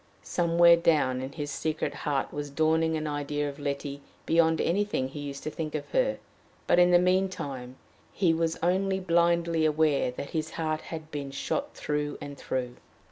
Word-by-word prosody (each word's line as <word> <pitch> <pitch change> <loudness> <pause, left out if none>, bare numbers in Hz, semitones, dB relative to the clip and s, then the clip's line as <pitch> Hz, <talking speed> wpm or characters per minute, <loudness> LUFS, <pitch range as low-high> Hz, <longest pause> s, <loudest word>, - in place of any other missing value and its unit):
Somewhere 170 0 +5
down 145 -6 +2
in 130 +1 -6
his 145 -2 -4
secret 155 0 -2
heart 140 -3 -2
was 145 0 -4
dawning 160 +2 +2
an 155 - -3
idea 145 0 -2
of 140 +1 -7
Letty 140 0 -4 0.2
beyond 165 -1 +3
anything 190 -7 0
he 145 - -8
used 140 -1 -6
to 155 - -3
think 155 -1 -4
of 145 - -4
her, - - +2 0.5
but - - +4
in 175 0 +6
the 175 - +7
mean 185 +2 +3
time 130 -7 -6 0.4
he 175 -4 +2
was 165 0 0
only 190 +2 +1
blindly 170 -2 +2
aware 155 -3 +2
that 125 +3 -7
his 160 -1 -2
heart 155 -1 -2
had 160 -1 -8
been 145 -2 -4
shot 280 - -3
through 150 0 -2
and 145 0 -7
through. 125 -2 -4
155 Hz, 180 wpm, -28 LUFS, 145-170 Hz, 0.5 s, the